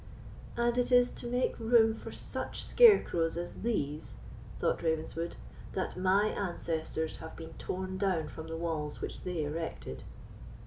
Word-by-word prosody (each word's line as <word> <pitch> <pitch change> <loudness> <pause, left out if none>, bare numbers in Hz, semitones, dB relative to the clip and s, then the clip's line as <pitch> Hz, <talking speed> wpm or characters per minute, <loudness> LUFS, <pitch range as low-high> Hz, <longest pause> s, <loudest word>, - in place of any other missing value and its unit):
"And 240 +1 +2
it 245 - +1
is 245 0 +6
to - - -6
make 245 +1 0
room 225 -1 +5
for 220 - -8
such - - -4
scarecrows 175 - +5
as 175 0 -5
these," 155 -10 -2 0.4
thought - - +1
Ravenswood, 160 +1 -1 0.4
"that 185 - -2
my 190 +3 +3
ancestors 160 -4 -2
have 160 - -9
been 165 -1 -9
torn 185 0 -3
down 185 -6 +1
from 160 +1 -8
the 165 0 -4
walls 160 -3 -2
which - - -5
they 175 -4 -2
erected!" 160 +3 -4
175 Hz, 145 wpm, -32 LUFS, 160-225 Hz, 0.4 s, is